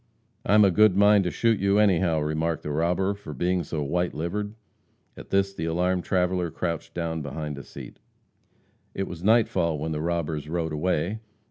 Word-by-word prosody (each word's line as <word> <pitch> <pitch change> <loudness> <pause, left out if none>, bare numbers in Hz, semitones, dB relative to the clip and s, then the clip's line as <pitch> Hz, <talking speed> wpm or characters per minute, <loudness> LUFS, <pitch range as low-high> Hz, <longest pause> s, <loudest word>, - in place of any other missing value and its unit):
"I'm 105 0 +5
a 95 - +4
good 105 +1 +4
mind 105 -1 +5
to - - +1
shoot 115 +3 +1
you, 100 +1 +2
anyhow," 90 -6 +3
remarked 80 +2 -1
the 75 - -4
robber, 85 +6 +1
"for 90 -7 -9
being 90 +6 0
so 75 0 -3
white 90 +5 -1
livered." 105 +7 -3 0.6
At - - -12
this 95 0 +1
the 80 -4 -4
alarmed 90 +2 0
traveller 90 -1 0
crouched 80 0 -4
down 80 -2 -2
behind 75 +1 -5
a - - -9
seat. - - -11 1.0
It 95 - -2
was 85 -1 -8
nightfall 95 -7 +2
when 80 +2 -3
the 75 -1 -2
robbers 80 -3 -2
rode 80 -1 -2
away. 90 +5 -1
85 Hz, 175 wpm, -25 LUFS, 80-95 Hz, 1.0 s, I'm